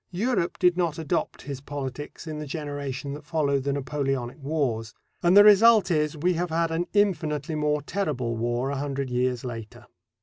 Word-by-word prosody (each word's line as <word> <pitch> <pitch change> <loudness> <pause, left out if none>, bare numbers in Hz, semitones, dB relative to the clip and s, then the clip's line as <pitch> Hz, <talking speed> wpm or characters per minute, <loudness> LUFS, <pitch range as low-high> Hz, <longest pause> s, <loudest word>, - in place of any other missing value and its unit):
Europe 195 -1 -1
did 180 -1 +4
not 170 -4 0
adopt 160 -3 -2
his 140 -2 -6
politics 145 +1 -6
in 155 -2 -5
the 150 - -6
generation 140 -2 -4
that 150 +1 -8
followed 145 -3 0
the 140 - 0
Napoleonic 135 -1 -2
Wars, 130 -6 -2 0.3
and 175 +3 +5
the 205 - +10
result 210 -1 +6
is 150 -1 +1
we 180 +4 +1
have 175 +1 -2
had 165 0 0
an 170 +2 -1
infinitely 160 -7 +1
more 150 -1 0
terrible 145 -10 -2
war 120 +3 -1
a 140 - -2
hundred 140 -2 -3
years 125 0 0
later. 115 -3 -7
150 Hz, 175 wpm, -26 LUFS, 135-170 Hz, 0.3 s, the